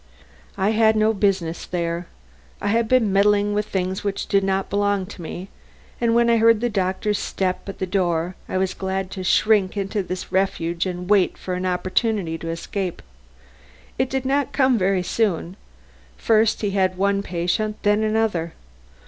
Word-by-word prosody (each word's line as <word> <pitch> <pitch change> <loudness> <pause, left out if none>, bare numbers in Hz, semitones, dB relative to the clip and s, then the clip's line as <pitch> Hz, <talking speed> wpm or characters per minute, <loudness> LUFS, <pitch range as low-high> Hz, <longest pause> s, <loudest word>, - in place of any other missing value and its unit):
I 195 +3 +2
had 220 0 +4
no 215 +1 +3
business 190 -5 0
there. 170 -1 -2 0.5
I 205 - -2
had 230 +1 +2
been 225 -5 +3
meddling 205 +1 +3
with 210 +1 -1
things 190 0 -2
which 200 -1 -2
did 195 -1 +2
not 195 0 0
belong 205 -1 0
to 180 - -10
me 175 +4 -7 0.5
and, 230 -1 +2
when 235 0 +4
I 235 0 +4
heard 230 -1 +5
the 240 +1 -1
doctor's 195 +1 0
step 185 0 -2
at 195 - -7
the 190 - -2
door, 175 -2 0
was 185 0 0
glad 190 0 -3
to 185 - -5
shrink 205 +1 +3
into 200 +1 -1
this 185 0 -6
refuge 180 -2 0
and 180 0 -5
wait 200 -2 +3
for 185 - -5
an 180 +1 -2
opportunity 185 0 0
to 165 - -5
escape. 180 +2 -4 1.0
It 260 0 +1
did 265 0 -2
not 275 +1 0
come 260 -2 +3
very 190 -3 +1
soon. 180 -3 -1 0.6
First 220 0 +2
he 205 -2 0
had 185 -2 +1
one 200 +1 +1
patient, 190 +4 -1
then 210 0 +3
another. 215 -7 0
195 Hz, 170 wpm, -22 LUFS, 185-215 Hz, 1.0 s, heard